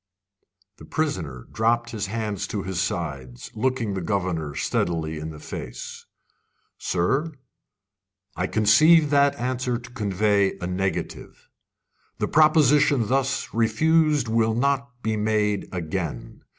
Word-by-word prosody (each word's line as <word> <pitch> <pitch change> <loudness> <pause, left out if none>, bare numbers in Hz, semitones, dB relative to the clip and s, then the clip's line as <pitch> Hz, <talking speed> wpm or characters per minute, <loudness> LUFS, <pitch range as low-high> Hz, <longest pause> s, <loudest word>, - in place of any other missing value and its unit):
The - - -12
prisoner 85 - -3
dropped 120 +1 +1
his 105 -2 -3
hands 105 -2 -3
to 100 -3 -4
his 95 -2 -2
sides, 70 -9 -4
looking 120 -2 -1
the 95 - -3
governor 85 -5 -2
steadily 80 -1 -1
in 80 +1 -5
the 80 - -9
face. 65 -4 -8 0.7
"Sir, 135 - 0 1.0
I 90 - -1
conceive 150 - +5
that 140 -1 +4
answer 125 0 -2
to 120 0 -12
convey 100 -3 +1
a 95 - -5
negative. 95 +1 -4 0.7
The - - -1
proposition 145 -5 +4
thus 135 0 0
refused 150 +4 +2
will 110 0 +1
not 140 +2 0
be 110 -1 0
made 105 -1 0
again. 85 -5 -5
110 Hz, 120 wpm, -24 LUFS, 90-130 Hz, 1.0 s, conceive